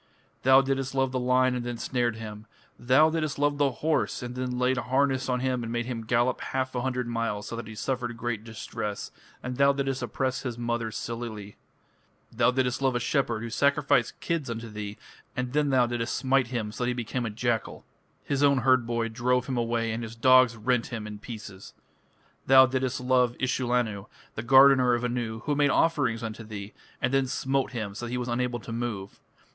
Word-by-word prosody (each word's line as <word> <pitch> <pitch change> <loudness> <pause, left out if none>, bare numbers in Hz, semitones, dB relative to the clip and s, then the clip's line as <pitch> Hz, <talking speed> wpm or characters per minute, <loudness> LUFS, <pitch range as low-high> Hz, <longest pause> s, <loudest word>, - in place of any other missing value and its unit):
Thou 130 +1 +6
didst 135 0 -2
love 135 -1 +1
the 130 - -1
lion 125 +1 +3
and 125 -1 -2
then 120 -1 -4
snared 120 -2 -1
him. 110 -1 -8 0.3
Thou 135 +6 +4
didst 155 -3 -2
love 145 0 +1
the 145 -1 +4
horse, 150 +1 -1
and 120 0 -5
then 125 0 -3
laid 125 +1 +1
harness 130 +1 +1
on 125 -1 0
him 130 -1 0
and 115 -1 -5
made 120 0 -1
him 115 -3 -5
gallop 120 +2 +1
half 130 0 -2
a 125 - -1
hundred 125 -1 -2
miles 115 -3 -2
so - - -5
that 115 -2 -6
he 110 - -9
suffered 120 0 -3
great 115 -2 -3
distress, 105 -2 -5 0.3
and 125 0 -4
thou 140 0 +5
didst 135 -1 -2
oppress 130 -1 -2
his 120 -4 -4
mother 120 -1 -2
Silili. 110 -3 -6 0.8
Thou - - +3
didst 125 0 0
love 130 -2 +2
a - - +1
shepherd 120 -3 0
who 115 - -5
sacrificed 140 -3 +2
kids 165 -6 -2
unto 115 0 -5
thee, 105 -1 -6 0.4
and 125 0 -2
then 150 -1 +2
thou 130 -2 +4
didst 120 0 -2
smite 135 -2 +2
him 115 -4 -3
so 125 - -4
that - - 0
he 125 - +1
became 120 +1 -3
a - - -2
jackal 115 +1 -1
(or - - -11
leopard); - - -38
his 140 -1 +1
own 140 -1 +5
herd 130 -2 +3
boy 115 -1 0
drove 125 +2 0
him 130 - -3
away 115 -1 0
and 115 +1 -3
his 115 0 -7
dogs 130 0 +5
rent 120 +2 0
him 115 -3 -5
in 105 -1 -7
pieces. 105 -4 -9 0.7
Thou 130 0 +8
didst 130 0 -1
love 125 -1 +2
Ishullanu, 120 -5 0 0.3
the - - -4
gardener 130 0 +6
of 120 - -3
Anu, 120 -2 -2
who 150 - -1
made 145 0 +3
offerings 130 -8 +1
unto 115 0 -5
thee, 105 -1 -8 0.3
and 125 +2 0
then 135 -1 +2
smote 135 +1 -1
him 110 -4 -4
so 120 +4 -6
that - - -7
he 125 - -1
was 125 0 -3
unable 120 0 -1
to 110 - -8
move. 115 -4 -4
125 Hz, 210 wpm, -27 LUFS, 115-130 Hz, 0.8 s, Thou